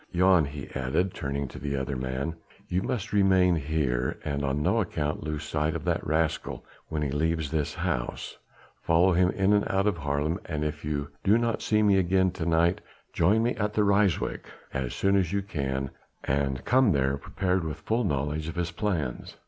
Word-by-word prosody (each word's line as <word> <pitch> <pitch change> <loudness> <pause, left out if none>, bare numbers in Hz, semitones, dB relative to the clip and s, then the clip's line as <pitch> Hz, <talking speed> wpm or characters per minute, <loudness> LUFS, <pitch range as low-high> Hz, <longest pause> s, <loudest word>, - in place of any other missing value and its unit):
Jan," 90 -2 +4
he 70 -1 -7
added, 65 +8 0
turning 70 -1 -3
to - - -9
the 70 -1 -2
other 65 +1 -2
man, 65 +5 -3 0.3
"you 90 +1 0
must 105 0 -3
remain 95 -3 +4
here 70 -5 -1
and 70 -1 -2
on 70 +2 0
no - - +2
account 75 +1 -2
lose 75 -1 -3
sight 75 0 -1
of - - -5
that - - 0
rascal 80 0 -1 0.2
when 75 -1 -2
he 70 - -1
leaves 80 0 0
this 75 -3 -1
house. - - -3 0.4
Follow 85 +3 +4
him 90 +1 +4
in 95 +2 +2
and 105 0 +4
out 95 +1 +1
of 100 -5 +1
Haarlem, 75 +4 -1
and 75 -2 -3
if 75 -1 -4
you 75 -1 -2
do 105 +3 +5
not 115 -1 0
see 105 0 +2
me 100 -2 +5
again 95 0 +2
to 85 -3 -4
night, 85 +2 +2 0.3
join 105 +7 +3
me 120 - +1
at 105 0 -1
Ryswyk 100 -3 +2 0.3
as 65 -3 -2
soon 100 0 +2
as 90 -3 +2
you 100 0 0
can, 70 -7 -3 0.3
and 70 -1 -1
come 125 -5 +4
there 70 -1 +1
prepared 90 +5 -1
with 75 -2 -4
full 110 +9 -1
knowledge 75 -2 -1
of 80 - -5
his 85 -1 -2
plans." 85 - -3
80 Hz, 190 wpm, -27 LUFS, 70-95 Hz, 0.4 s, do